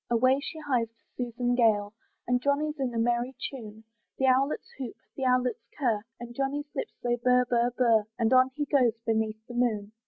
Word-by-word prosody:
Away 255 Hz, +3 st, +3 dB
she 310 Hz, +3 st, -7 dB
hies 260 Hz, -7 st, 0 dB
to 225 Hz, -, -39 dB, 0.2 s
Susan 245 Hz, 0 st, -1 dB
Gale: 215 Hz, -4 st, +2 dB, 0.3 s
And 245 Hz, 0 st, +2 dB
Johnny's 295 Hz, +2 st, 0 dB
in 260 Hz, -2 st, -1 dB
a 235 Hz, -, -4 dB
merry 240 Hz, +3 st, 0 dB, 0.2 s
tune, 220 Hz, -5 st, -9 dB, 0.3 s
The 265 Hz, -, +1 dB
owlets 270 Hz, +3 st, +1 dB
hoot, 250 Hz, -4 st, -5 dB, 0.2 s
the 265 Hz, -, -3 dB
owlets 250 Hz, -2 st, +1 dB, 0.2 s
curr, 235 Hz, -7 st, +1 dB, 0.2 s
And 240 Hz, 0 st, -8 dB
Johnny's 275 Hz, +3 st, -2 dB
lips 285 Hz, -, -4 dB
they 240 Hz, 0 st, +1 dB
burr, 250 Hz, +1 st, +3 dB
burr, 240 Hz, 0 st, +2 dB
burr, 230 Hz, -4 st, +4 dB
And 230 Hz, +1 st, +2 dB
on 255 Hz, 0 st, +6 dB
he 295 Hz, -1 st, -1 dB
goes 255 Hz, -5 st, +2 dB
beneath 220 Hz, -1 st, -1 dB
the 245 Hz, -, -10 dB
moon. 220 Hz, -4 st, 0 dB
245 Hz, 190 wpm, -28 LUFS, 230-265 Hz, 0.3 s, on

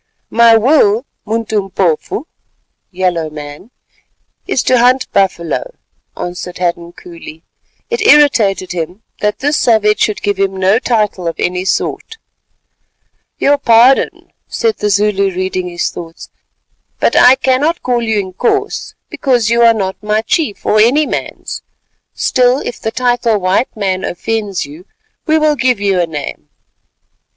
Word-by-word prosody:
"My 230 Hz, 0 st, +6 dB
will, 230 Hz, -2 st, +3 dB, 0.2 s
Muntumpofu 205 Hz, -, -1 dB, 0.7 s
(yellow 180 Hz, -4 st, -1 dB
man), 150 Hz, +6 st, -10 dB, 0.8 s
is -, -, 0 dB
to 255 Hz, -1 st, +3 dB
hunt 250 Hz, +2 st, +3 dB
buffalo," 195 Hz, -, -1 dB, 0.4 s
answered 180 Hz, 0 st, -6 dB
Hadden 170 Hz, -1 st, -2 dB
coolly. 165 Hz, -2 st, -12 dB, 0.5 s
It 470 Hz, -1 st, -1 dB
irritated 270 Hz, -, +4 dB
him 180 Hz, +4 st, -5 dB, 0.2 s
that 210 Hz, 0 st, -1 dB
this 290 Hz, +2 st, 0 dB
savage 215 Hz, -2 st, +2 dB
should 215 Hz, -, 0 dB
give 205 Hz, -2 st, -1 dB
him 195 Hz, -1 st, 0 dB
no 190 Hz, +4 st, +3 dB
title 210 Hz, -8 st, -1 dB
of 165 Hz, -, -2 dB
any 180 Hz, +1 st, -2 dB
sort. 450 Hz, -, -2 dB, 1.2 s
"Your 285 Hz, 0 st, +2 dB
pardon," 240 Hz, +1 st, +3 dB
said 450 Hz, -2 st, -1 dB
the 210 Hz, -, -1 dB
Zulu 200 Hz, 0 st, +1 dB
reading 185 Hz, -1 st, -2 dB
his 175 Hz, 0 st, -2 dB
thoughts, 165 Hz, 0 st, -10 dB, 0.7 s
"but -, -, +1 dB
I 250 Hz, +1 st, +7 dB
cannot 275 Hz, +6 st, 0 dB
call 245 Hz, -1 st, 0 dB
you 220 Hz, -2 st, 0 dB
Inkoos 245 Hz, -, -2 dB
because 245 Hz, -5 st, 0 dB
you 235 Hz, 0 st, +3 dB
are 230 Hz, -1 st, +7 dB
not 190 Hz, -3 st, -3 dB
my 210 Hz, +1 st, 0 dB
chief, 230 Hz, -2 st, -1 dB
or 215 Hz, -, +3 dB
any 260 Hz, +8 st, +4 dB
man's; -, -, -5 dB, 0.5 s
still 250 Hz, 0 st, +2 dB
if 245 Hz, -, -6 dB
the 220 Hz, -, -2 dB
title 240 Hz, -1 st, 0 dB
'white 195 Hz, +6 st, -1 dB
man' 190 Hz, -2 st, -1 dB
offends 210 Hz, -1 st, -3 dB
you, 155 Hz, +6 st, -13 dB, 0.4 s
we 315 Hz, 0 st, +3 dB
will 305 Hz, -1 st, +2 dB
give 250 Hz, -4 st, +1 dB
you 200 Hz, -2 st, +1 dB
a 170 Hz, -, -1 dB
name." 145 Hz, -, -7 dB
210 Hz, 140 wpm, -14 LUFS, 185-245 Hz, 1.2 s, I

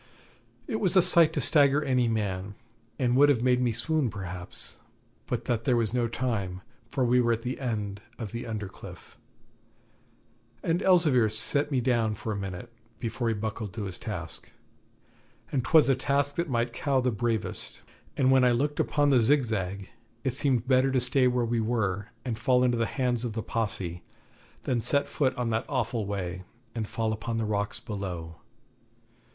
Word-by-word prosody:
It 220 Hz, -, -2 dB
was 190 Hz, -2 st, +1 dB
a 185 Hz, -, +8 dB
sight 170 Hz, -3 st, +6 dB
to -, -, -1 dB
stagger 145 Hz, -1 st, +4 dB
any 130 Hz, -3 st, +2 dB
man, 100 Hz, -3 st, -2 dB, 0.4 s
and 125 Hz, -2 st, +1 dB
would 145 Hz, +1 st, +6 dB
have 125 Hz, -5 st, +2 dB
made 125 Hz, 0 st, +3 dB
me 125 Hz, -2 st, +2 dB
swoon 135 Hz, +4 st, 0 dB
perhaps, 90 Hz, -3 st, -5 dB, 0.5 s
but -, -, -3 dB
that 115 Hz, -2 st, -1 dB
there 125 Hz, -2 st, +3 dB
was 115 Hz, -1 st, 0 dB
no 120 Hz, -2 st, +1 dB
time, 105 Hz, -6 st, -2 dB, 0.3 s
for 130 Hz, 0 st, 0 dB
we 125 Hz, +1 st, +4 dB
were 120 Hz, -1 st, +2 dB
at 115 Hz, 0 st, -4 dB
the 125 Hz, +1 st, -3 dB
end 105 Hz, -6 st, -3 dB, 0.2 s
of 110 Hz, -5 st, -6 dB
the 120 Hz, +1 st, -5 dB
under 105 Hz, -3 st, -4 dB
cliff, 95 Hz, -, -12 dB, 1.5 s
and 170 Hz, +3 st, +1 dB
Elzevir 155 Hz, -, +4 dB
set 140 Hz, +7 st, +1 dB
me 135 Hz, -4 st, +1 dB
down 115 Hz, -3 st, +1 dB
for 110 Hz, +2 st, -5 dB
a -, -, -2 dB
minute, 100 Hz, +4 st, -6 dB, 0.3 s
before 115 Hz, 0 st, -2 dB
he 115 Hz, -, +1 dB
buckled 110 Hz, -2 st, -4 dB
to 110 Hz, -, -3 dB
his 95 Hz, -2 st, -6 dB
task. 90 Hz, -6 st, -6 dB, 1.0 s
And 130 Hz, -4 st, 0 dB
'twas 155 Hz, +4 st, +5 dB
a 135 Hz, -, +5 dB
task 140 Hz, +2 st, 0 dB
that 170 Hz, -1 st, -1 dB
might 120 Hz, -1 st, 0 dB
cow 135 Hz, +1 st, +1 dB
the 125 Hz, 0 st, +1 dB
bravest, 110 Hz, 0 st, -3 dB, 0.3 s
and 135 Hz, -2 st, +4 dB
when 130 Hz, -1 st, +5 dB
I 125 Hz, -1 st, +5 dB
looked 145 Hz, +5 st, -1 dB
upon 145 Hz, -1 st, +2 dB
the 130 Hz, -, +5 dB
Zigzag, 110 Hz, -7 st, +1 dB, 0.4 s
it 130 Hz, -, 0 dB
seemed 130 Hz, -3 st, +1 dB
better 130 Hz, 0 st, +4 dB
to 130 Hz, -, +3 dB
stay 125 Hz, +1 st, +3 dB
where 125 Hz, -1 st, +1 dB
we 115 Hz, 0 st, 0 dB
were 105 Hz, -3 st, -1 dB, 0.2 s
and 115 Hz, -3 st, -3 dB
fall 125 Hz, -1 st, +3 dB
into 125 Hz, -1 st, +3 dB
the 115 Hz, -, +1 dB
hands 125 Hz, -3 st, -1 dB
of 120 Hz, -3 st, -3 dB
the 110 Hz, -1 st, -3 dB
Posse 95 Hz, -7 st, -3 dB, 0.6 s
than 120 Hz, -3 st, 0 dB
set 140 Hz, +4 st, +1 dB
foot 135 Hz, -4 st, 0 dB
on 120 Hz, -2 st, -1 dB
that 110 Hz, 0 st, 0 dB
awful 120 Hz, -5 st, -1 dB
way, 90 Hz, -3 st, -3 dB, 0.3 s
and 110 Hz, -3 st, -3 dB
fall 110 Hz, -1 st, -1 dB
upon 115 Hz, +1 st, -3 dB
the 115 Hz, -, -1 dB
rocks 105 Hz, -1 st, -1 dB
below. 90 Hz, -7 st, -6 dB
120 Hz, 185 wpm, -28 LUFS, 105-130 Hz, 1.5 s, a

